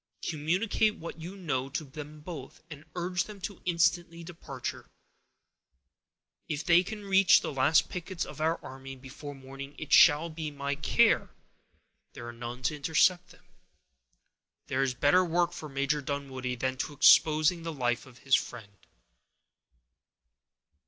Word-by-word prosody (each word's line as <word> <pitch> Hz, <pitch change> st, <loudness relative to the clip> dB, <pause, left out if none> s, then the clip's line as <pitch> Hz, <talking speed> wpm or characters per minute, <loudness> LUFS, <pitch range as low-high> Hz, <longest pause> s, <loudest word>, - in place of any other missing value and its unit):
Communicate 185 Hz, +7 st, +1 dB
what 165 Hz, 0 st, -9 dB
you 180 Hz, +4 st, -7 dB
know 135 Hz, -8 st, -2 dB
to 155 Hz, +3 st, -3 dB
them 150 Hz, +2 st, -10 dB
both, 150 Hz, -5 st, -9 dB
and 150 Hz, 0 st, -10 dB
urge 180 Hz, +1 st, -1 dB
them 210 Hz, -2 st, -11 dB
to 190 Hz, 0 st, -6 dB
instant 175 Hz, 0 st, +2 dB, 0.2 s
departure. 170 Hz, -1 st, -7 dB, 1.6 s
If 150 Hz, -1 st, -3 dB
they 170 Hz, 0 st, +6 dB
can 210 Hz, +2 st, -7 dB
reach 195 Hz, -1 st, +5 dB
the -, -, -4 dB
last 135 Hz, +4 st, +3 dB
pickets 180 Hz, 0 st, -5 dB
of -, -, -9 dB
our 160 Hz, +1 st, +1 dB
army 135 Hz, 0 st, -9 dB
before 140 Hz, +2 st, -10 dB
morning, 135 Hz, +1 st, -10 dB
it 155 Hz, -, -4 dB
shall 160 Hz, +1 st, +6 dB
be 155 Hz, -1 st, -5 dB
my 140 Hz, -1 st, -3 dB
care 150 Hz, +2 st, +3 dB
that -, -, -31 dB, 0.8 s
there 120 Hz, -, -9 dB
are 120 Hz, -, -7 dB
none 120 Hz, +2 st, -7 dB
to 150 Hz, -, 0 dB
intercept 175 Hz, +4 st, +2 dB
them. 180 Hz, -, -20 dB, 1.2 s
There 130 Hz, -, -1 dB
is 130 Hz, -2 st, 0 dB
better 145 Hz, +8 st, +4 dB
work 175 Hz, 0 st, +1 dB
for 155 Hz, -, -8 dB
Major 140 Hz, +2 st, -1 dB
Dunwoodie 135 Hz, -3 st, -4 dB
than 130 Hz, +2 st, -2 dB
to -, -, -2 dB
be 150 Hz, -, -12 dB
exposing 155 Hz, +4 st, +5 dB
the 165 Hz, 0 st, -4 dB
life 120 Hz, -4 st, -2 dB
of 125 Hz, -2 st, -16 dB
his 135 Hz, 0 st, -5 dB
friend." 105 Hz, -4 st, 0 dB
150 Hz, 150 wpm, -29 LUFS, 135-175 Hz, 1.6 s, they